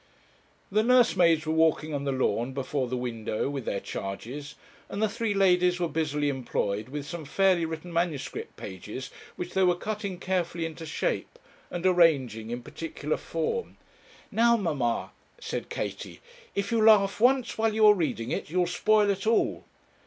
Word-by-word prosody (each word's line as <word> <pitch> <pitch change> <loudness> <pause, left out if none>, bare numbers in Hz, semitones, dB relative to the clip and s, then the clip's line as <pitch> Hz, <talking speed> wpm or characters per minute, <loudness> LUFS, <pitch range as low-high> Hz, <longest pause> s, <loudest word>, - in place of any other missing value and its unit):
The 210 +2 +3
nursemaids 185 -10 +4
were 155 - 0
walking 160 -1 +2
on 140 -1 -2
the 140 - 0
lawn 130 -1 0
before 135 0 -2
the 125 +1 -2
window 115 0 -2
with 135 -4 -4
their 100 - -1
charges, 125 +12 -6 0.3
and - - -5
the 220 - +3
three 220 0 -2
ladies 180 -2 +3
were 175 - +1
busily 150 -2 -1
employed 115 -5 -2
with 145 +1 -5
some 170 +1 -6
fairly 185 +3 +2
written 160 +2 -6
manuscript 170 -4 -2
pages, 105 +8 -7 0.2
which 180 0 -6
they 190 - +2
were 180 -1 +4
cutting 200 0 -4
carefully 175 -2 -1
into 160 0 -7
shape, - - -2 0.3
and 175 0 -5
arranging 140 - +3
in 120 +1 -4
particular 155 0 -4
form. 165 - -3 0.5
'Now, 235 +2 +4
mamma,' 145 - -1 0.3
said - - -5
Katie, - - -5 0.4
'if 200 +2 -1
you 225 -2 +2
laugh 210 -2 +5
once 255 0 +3
while 220 -1 +2
you 220 -1 +5
are 210 - +9
reading 155 - -2
it, - - -3
you'll 180 +2 +2
spoil 210 +4 +3
it 195 +2 -3
all.' 225 - +1
165 Hz, 165 wpm, -27 LUFS, 140-195 Hz, 0.5 s, are